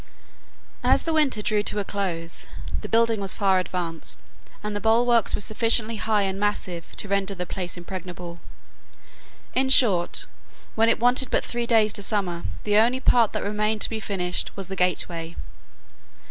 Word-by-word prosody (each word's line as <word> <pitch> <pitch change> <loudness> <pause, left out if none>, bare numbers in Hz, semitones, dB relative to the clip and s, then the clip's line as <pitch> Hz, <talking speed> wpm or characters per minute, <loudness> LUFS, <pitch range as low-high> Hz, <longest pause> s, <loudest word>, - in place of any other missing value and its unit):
As - - +3
the 325 - -1
winter 280 -9 +2
drew 210 -1 +1
to 210 - -2
a 205 - 0
close, 180 -5 -4 0.3
the - - -7
building 230 -1 +2
was 195 -1 +2
far 195 -2 +3
advanced, 175 -3 -4 0.4
and 210 0 -4
the - - -1
bulwarks 230 +1 +3
were - - -4
sufficiently 225 +1 +2
high 210 -1 +1
and 195 0 -2
massive 190 -4 -3
to - - -5
render 200 0 0
the 180 -1 -4
place 180 -1 -5
impregnable. 175 -1 -7 1.1
In 265 +1 +2
short, 200 -10 +3 0.5
when 225 +1 +3
it - - +2
wanted 250 +2 +3
but - - 0
three 240 -1 -3
days 220 -3 +4
to - - 0
summer, 190 -5 -1 0.2
the 210 0 +2
only 240 +4 +3
part 235 -4 +4
that - - -2
remained 210 +1 -1
to - - +4
be 220 - -2
finished 180 -4 -3
was 195 -2 -6
the 195 - -4
gateway. 170 -2 -1
205 Hz, 170 wpm, -24 LUFS, 180-225 Hz, 1.1 s, days